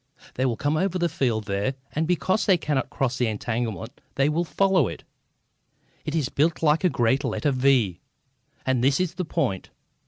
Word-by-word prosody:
"They 130 +1 0
will 115 -3 -1
come 145 +2 0
over 185 +1 0
the 175 -1 +1
field 125 -9 0
there, 100 +5 -1 0.2
and 155 +1 -1
because 185 +3 +1
they 190 -3 +5
cannot 145 -5 -1
cross 130 -1 -1
the 125 - +2
entanglement 110 -2 -3
they 135 +2 +3
will 165 +3 +1
follow 190 - +2
it. - - -7 1.0
It 155 - -2
is 150 -5 +1
built 160 +5 0
like 150 +2 +3
a 180 - +4
great 130 0 +1
letter 140 +4 0
V, 130 -8 +2 0.7
and 130 -2 +1
this 135 +1 +3
is 180 -2 0
the 180 -1 -3
point." 135 - -2
140 Hz, 185 wpm, -25 LUFS, 120-165 Hz, 1.0 s, they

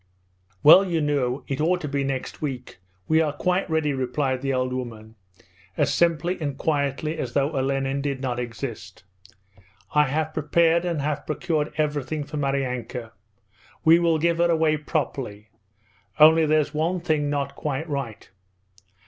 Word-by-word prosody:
'Well, 160 +6 +9
you 175 -4 -1
know, 140 -3 0
it 135 +1 -2
ought 180 +3 +2
to 150 - -4
be 140 0 -1
next 135 -1 -4
week. 130 - -5 0.3
We 160 0 +4
are 155 -2 +1
quite 180 +7 -1
ready,' 160 -2 +1
replied 130 0 -1
the 135 0 -1
old 130 -1 -1
woman, 115 -4 -6 0.6
as - - +2
simply 170 +1 +1
and 140 -3 -3
quietly 150 +1 -1
as 125 -4 -4
though 140 +1 +1
Olenin 135 -1 -1
did 140 -2 -2
not 125 -2 -2
exist. 115 -6 -6 0.9
'I 150 0 +5
have 155 +3 -2
prepared 165 +3 +2
and 165 -5 -1
have 150 0 -3
procured 155 -1 -1
everything 150 0 -1
for 150 +2 -7
Maryanka. 125 -4 -2 0.7
We 165 +1 +7
will 170 -2 +2
give 170 +1 +1
her 170 0 +3
away 160 -2 +3
properly. 135 -8 -4 0.7
Only 160 +1 +7
there's 155 -1 +2
one 165 +4 0
thing 155 -4 0
not 145 -1 -2
quite 150 +2 -3
right. 140 -7 -5
145 Hz, 155 wpm, -24 LUFS, 135-160 Hz, 0.9 s, Well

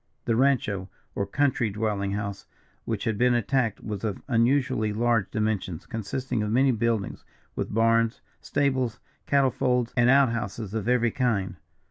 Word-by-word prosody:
"The 115 - +1
rancho 110 -7 +1 0.2
or 100 - -2
country 135 -5 +1
dwelling 100 -1 -2
house 100 -1 -4 0.4
which 110 -3 -2
had 110 -3 -1
been 125 0 +4
attacked 120 -1 0
was 105 -2 -5
of 105 -3 -3
unusually 125 -2 +2
large 115 -2 +1
dimensions, 105 -6 -2
consisting 120 +1 -3
of 105 - -1
many 130 +4 +3
buildings, 115 -3 -1 0.3
with - - -3
barns, 115 +1 +2 0.2
stables, 130 -5 0 0.3
cattle 140 -2 +3
folds, 125 -2 0
and 120 -1 +4
out 135 -1 +6
houses 110 -3 -4
of 110 -1 -3
every 120 -2 +3
kind. 110 -8 0
115 Hz, 150 wpm, -26 LUFS, 105-125 Hz, 0.4 s, out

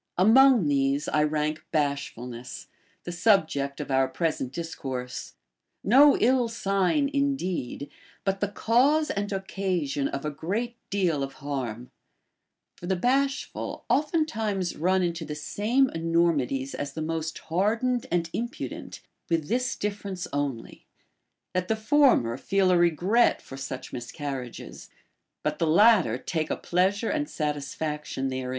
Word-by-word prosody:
Among 235 - +6
these 140 +1 +1
I 150 - +2
rank 150 +1 0
bashfulness, 135 -5 -3 0.3
the 175 - -5
subject 160 -7 +2
of - - -5
our 130 0 +3
present 145 -3 -2
dis 165 +3 -5
course; 125 -2 -6 0.5
no 275 +7 +6
ill 250 0 +3
sign 200 - +1
indeed, 190 - -1 0.4
but 195 0 0
the 205 - 0
cause 260 +9 +2
and 205 +1 -2
occasion 185 -8 -1
of 140 +2 -5
a 150 - -1
great 210 +11 -3
deal 180 -7 +1
of 135 0 -3
harm. 125 -4 -5 0.9
For 175 - -8
the 190 - +1
bashful 270 +7 -1
oftentimes 225 - 0
run 185 +3 +2
into 170 -1 -2
the 150 -1 -5
same 240 - +1
enormities 165 -6 0
as 145 -1 -4
the 155 - -4
most 160 0 -3
hardened 225 +8 0
and 170 -1 +1
impudent, 235 +2 -5 0.3
with 165 -3 0
this 250 +2 0
difference 200 -3 -4
only, 140 -5 -4 0.7
that 185 0 -1
the 220 - +1
former 220 - +3
feel 190 +5 +2
a 180 - +4
regret 175 +8 +3
for 135 - -11
such 135 -1 -6
miscarriages, 130 0 -6 0.5
but 150 0 -1
the 165 - +1
latter 185 - +5
take 160 +3 -3
a - - -1
pleasure 195 +5 +1
and 295 -1 -1
satis 150 -2 -3
faction 150 -3 -3
therem. 130 -1 -3
170 Hz, 135 wpm, -27 LUFS, 145-215 Hz, 0.9 s, Among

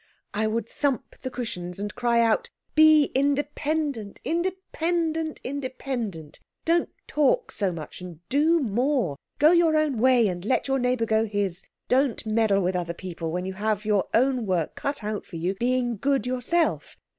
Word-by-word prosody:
"I 215 +1 0
would 225 0 -1
thump 275 -2 -2
the 260 - -4
cushions, 180 -9 -5
and 205 +1 -4
cry 240 -1 +2
out, 230 - +2 0.2
'Be 310 -1 +6
independent, 285 -4 -1
independent, 335 -2 -1
independent! 250 - -5 0.3
Don't 335 +1 +2 0.2
talk 305 - +1
so 195 -3 0
much, 165 0 -8
and 175 -4 -9
do 315 +5 +3
more. 245 - 0 0.2
Go 305 +2 +6
your 335 -3 +4
own 300 -6 +1
way, 250 -2 +5
and 175 -2 -3
let 255 +6 0
your 270 0 +1
neighbour 250 -2 +1
go 220 0 +2
his. 200 -4 -2 0.3
Don't 260 -2 +1
meddle 215 -3 +2
with 180 +1 0
other 170 -1 -2
people 170 -2 -5
when 180 +2 -2
you 190 - -4
have 210 +1 -1
all - - -6
your 205 -3 +2
own 250 -2 +2
work 175 -4 0
cut 280 -4 -4
out 210 0 -3
for - - -10
you 175 +3 -1
being 245 +2 0
good 270 +1 +1
yourself. 255 +7 0
245 Hz, 170 wpm, -25 LUFS, 200-285 Hz, 0.3 s, Be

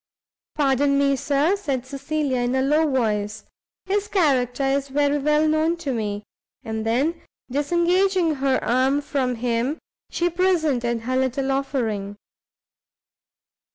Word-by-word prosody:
"Pardon 280 -1 +2
me, 280 0 +3
Sir," 290 +7 +1
said 275 -10 -3
Cecilia, 280 0 -2
in 245 +1 0
a 265 - +2
low 305 +3 +2
voice, 215 -4 -1 0.4
"his 405 +2 -1
character 275 - +1
is 275 +1 0
very 285 +1 +1
well 300 +2 +2
known 315 +2 +1
to 300 -6 -3
me." 210 -3 -3 0.4
And 220 -2 -4
then, 285 +9 0 0.3
disengaging 345 +4 +2
her 265 -1 +1
arm 260 +4 +2
from 265 -3 -1
him, 240 +5 -1 0.3
she 350 - 0
presented 315 -10 +1
her 255 +3 -2
little 265 +1 0
offering. 225 -7 -2
275 Hz, 125 wpm, -23 LUFS, 250-310 Hz, 0.4 s, me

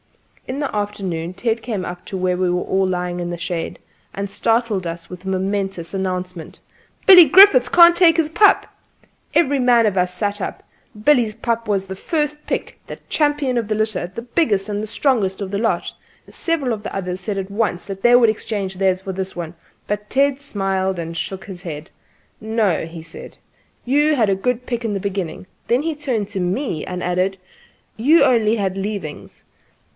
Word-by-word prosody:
In 265 +2 -4
the 285 -6 -3
afternoon 190 -5 -3
Ted 225 +3 -1
came 210 -6 -3
up 175 0 -7
to 195 - -5
where 180 -1 0
we 180 0 0
were 180 0 0
all 190 0 +1
lying 180 -1 -2
in 175 - -3
the 175 - -4
shade 170 0 -4 0.4
and 200 0 -4
startled 225 -3 0
us 165 0 -7
with 180 -1 -9
the 190 - -6
momen¬tous 190 -2 -2
announcement: 185 -3 -4 0.5
"Billy 370 -3 +10
Griffiths 290 -6 +7
can't 345 +2 +7
take 345 -2 +5
his 325 -2 +2
pup!" 410 +6 +4 0.7
Every 285 -4 +3
man 245 -2 +4
of 205 -3 +1
us 180 -1 +1
sat 205 +1 -2
up. - - -5 0.4
Billy's 245 -8 +3
pup 230 -1 -2
was 195 -2 0
the 190 0 -7
first 300 - -2
pick, - - -3
the - - -7
champion 290 -4 +1
of 230 -3 -1
the 215 - +1
litter, 215 -5 -1
the 230 - -6
biggest 235 - +1
and 210 0 -3
strongest 210 -4 0
of 195 -2 -5
the 200 - -1
lot. 225 - -1 0.3
Several 295 -8 -1
of 215 - -5
the - - -6
others 185 -1 -4
said 200 +1 -3
at 195 0 -4
once 200 -4 -1
that 195 -1 -7
they 240 +2 +6
would 240 -2 +6
exchange 205 -3 -3
theirs 190 0 +1
for 190 0 -5
this 190 0 -5
one; 170 -1 -5 0.3
but 210 0 -3
Ted 275 0 +2
smiled 195 -6 -1
and 165 0 -5
shook 190 +3 -5
his 185 -3 -8
head. 155 -4 -7 0.5
"No," 215 -7 0
he 165 -1 -9
said, 165 - -11 0.3
" - - -40 0.2
you 295 +4 +3
had 225 -6 +2
a 195 - +2
good 250 +5 -2
pick 240 -1 -3
in 215 -3 -2
the - - -1
beginning." 190 -3 -4 0.2
Then 245 +4 +2
he 325 -1 -2
turned 255 -9 -2
to 200 -2 -4
me, 180 - -2
and 180 -1 -5
added: 185 +2 0 0.6
"You've 295 +9 +4
only 225 -3 +3
had 195 -4 -1
leavings." 195 -6 -6
205 Hz, 195 wpm, -20 LUFS, 185-245 Hz, 0.7 s, Billy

